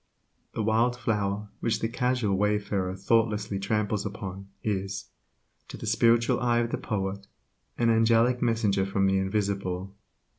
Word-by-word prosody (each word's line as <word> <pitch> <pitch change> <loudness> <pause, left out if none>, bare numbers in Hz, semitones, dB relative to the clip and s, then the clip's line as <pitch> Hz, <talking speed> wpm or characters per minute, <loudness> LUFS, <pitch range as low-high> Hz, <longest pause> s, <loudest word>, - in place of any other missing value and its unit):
The 110 - -1
wild 115 +3 +2
flower 105 -3 -1
which 115 - 0
the 115 - 0
casual 125 -3 0
wayfarer 100 -2 0
thoughtlessly 105 0 +1
tramples 105 0 0
upon 100 -2 -6 0.2
is, 100 -2 -3 0.6
to - - -8
the - - -7
spiritual 115 0 +3
eye 120 -1 +2
of 120 0 0
the - - -2
poet, 100 -1 -3 0.5
an 115 -1 +3
angelic 115 +2 +3
messenger 110 -5 +1
from 100 0 +1
the 95 0 +3
invisible. 95 -1 -2
105 Hz, 140 wpm, -27 LUFS, 100-115 Hz, 0.6 s, spiritual